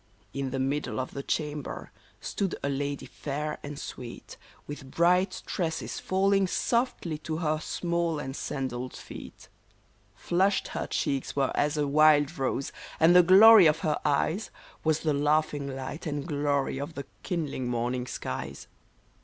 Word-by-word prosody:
In 135 -1 -2
the 135 - -3
middle 135 +1 -1
of 130 - -3
the 140 - -5
chamber 150 0 -3 0.3
stood 195 -3 -2
a 140 - 0
lady 140 0 -2
fair 150 +1 -4
and 145 0 -7
sweet, 125 -4 -8 0.3
With 145 -2 -8
bright 180 +5 +2
tresses 165 -3 -3
falling 195 +1 +2
softly 210 -8 0
to 155 0 -4
her 155 -2 0
small 170 0 -1
and 135 -2 -5
sandalled 130 -3 -4
feet. - - -10 0.7
Flushed 185 - +1
her - - -3
cheeks 140 -3 -2
were 135 -2 +1
as 150 +1 +1
a 150 - +2
wild 150 +1 +5
rose, 135 +1 -1 0.3
and 165 +2 +6
the 180 - +10
glory 195 +2 +9
of 155 +1 +2
her 155 -3 0
eyes 160 +8 +1 0.3
Was 155 -1 +2
the 155 -2 +1
laughing 145 0 +1
light 135 +6 -6
and 145 -1 -3
glory 145 -3 0
of 145 +3 -5
the 140 - -5 0.2
kindling 150 -7 -3
morning 125 +1 -1
skies. - - -5
150 Hz, 150 wpm, -28 LUFS, 140-170 Hz, 0.7 s, the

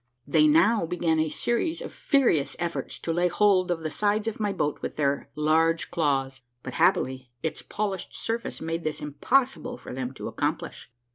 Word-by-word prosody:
They 155 +2 +4
now 170 +5 +4
began 165 -2 +1
a 155 0 +1
series 280 - -1
of - - -7
furious 245 - +2
efforts 170 -1 -3
to 165 - -3
lay 175 +2 +2
hold 185 -1 +3
of 170 -2 -1
the 155 -1 -3
sides 210 +3 +1
of 225 - -3
my 210 -2 0
boat 150 -6 -1
with - - -4
their 140 -1 0
Imge 160 +2 +2
claws, 135 -5 0 0.2
but 125 - -6
happily 130 -1 +1
its 160 - -2
polished 200 -3 -4
surface 230 +1 -3
made 165 +1 -3
this 155 -1 -2
impossible 245 - 0
for - - -9
them 130 0 -3
to - - -6
accomplish. - - -3
165 Hz, 180 wpm, -26 LUFS, 150-210 Hz, 0.2 s, They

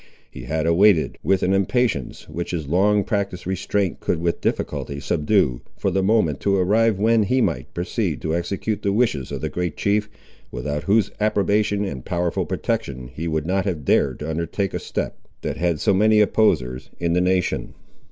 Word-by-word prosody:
He - - -9
had 80 +4 -1
awaited, 85 +1 +4
with 95 -1 +1
an 95 - +2
impatience 100 - 0
which 85 +1 -5
his 85 -4 -3
long 100 +6 +3
practised 100 -4 -2
restraint 95 0 -1
could - - -1
with 85 0 -1
difficulty 70 0 -2
subdue, 75 - +1 0.2
for - - 0
the 95 - +1
moment 95 -7 +2
to 100 -1 +1
arrive 105 +3 +3
when 110 +2 +3
he 125 +6 +1
might - - -1
proceed 85 - -2
to 80 0 0
execute 100 +5 -2
the 100 - 0
wishes 100 - 0
of - - -4
the - - -2
great 90 -2 -3
chief, 105 +1 +1 0.4
without 75 +4 -4
whose 100 0 +3
approbation 105 0 +1
and 65 -10 -5
powerful 85 -1 -1
protection 65 -2 -3
he 85 +2 -4
would 80 -2 -1
not 95 +2 0
have 85 -8 -3
dared - - +2
to 75 - -4
undertake 85 +4 -2
a - - -2
step, - - -4 0.2
that - - -3
had 85 -2 0
so 100 - +2
many 105 +2 +4
opposers 65 - +2
in 85 -1 0
the 90 - +3
nation. 90 0 0
90 Hz, 180 wpm, -22 LUFS, 80-105 Hz, 0.4 s, awaited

